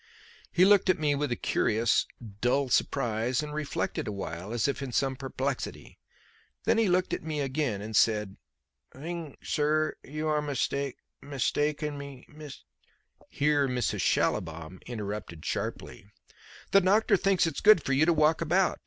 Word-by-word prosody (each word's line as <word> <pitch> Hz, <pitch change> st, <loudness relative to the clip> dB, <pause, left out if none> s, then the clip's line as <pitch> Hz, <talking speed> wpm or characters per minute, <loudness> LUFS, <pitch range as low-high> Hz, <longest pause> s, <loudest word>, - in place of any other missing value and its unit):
He 180 Hz, +1 st, +5 dB
looked 200 Hz, -1 st, +5 dB
at 185 Hz, -, +4 dB
me 150 Hz, -2 st, +1 dB
with 145 Hz, -1 st, -1 dB
a -, -, +1 dB
curious, 115 Hz, +1 st, +1 dB, 0.3 s
dull 130 Hz, +2 st, +2 dB
surprise, 120 Hz, 0 st, 0 dB
and 150 Hz, 0 st, -6 dB
reflected 150 Hz, -5 st, -3 dB
awhile 95 Hz, -2 st, -5 dB
as 120 Hz, +1 st, 0 dB
if 140 Hz, -, -2 dB
in 135 Hz, -2 st, -4 dB
some 135 Hz, +2 st, 0 dB
perplexity. 135 Hz, 0 st, -4 dB, 0.6 s
Then -, -, +2 dB
he 225 Hz, -, +3 dB
looked 185 Hz, +1 st, +1 dB
at -, -, -2 dB
me 155 Hz, -1 st, -4 dB
again 130 Hz, -7 st, -1 dB
and 110 Hz, 0 st, -6 dB
said: 105 Hz, -3 st, +2 dB, 0.5 s
"Thing, 160 Hz, +1 st, -7 dB
sir, 155 Hz, +1 st, +1 dB
you 155 Hz, +2 st, -4 dB
are 150 Hz, -1 st, +1 dB
mistake 140 Hz, -1 st, -2 dB, 0.2 s
mistaken 145 Hz, +2 st, -1 dB
me 140 Hz, -2 st, -9 dB
mist 150 Hz, -2 st, -11 dB, 0.4 s
" -, -, -48 dB, 0.2 s
Here 145 Hz, -1 st, +2 dB
Mrs. 125 Hz, -5 st, -1 dB
Schallibaum 85 Hz, -2 st, -1 dB
interrupted 105 Hz, -7 st, -6 dB
sharply: -, -, -4 dB, 0.6 s
"The 195 Hz, -, +6 dB
doctor 200 Hz, +4 st, +4 dB
thinks 195 Hz, -3 st, +2 dB
it's 165 Hz, -3 st, -3 dB
good 210 Hz, -7 st, +6 dB
for 135 Hz, -, 0 dB
you 150 Hz, +5 st, +3 dB
to 170 Hz, -, +5 dB
walk 155 Hz, +1 st, +3 dB
about. 180 Hz, +3 st, +2 dB
140 Hz, 155 wpm, -28 LUFS, 120-155 Hz, 0.6 s, The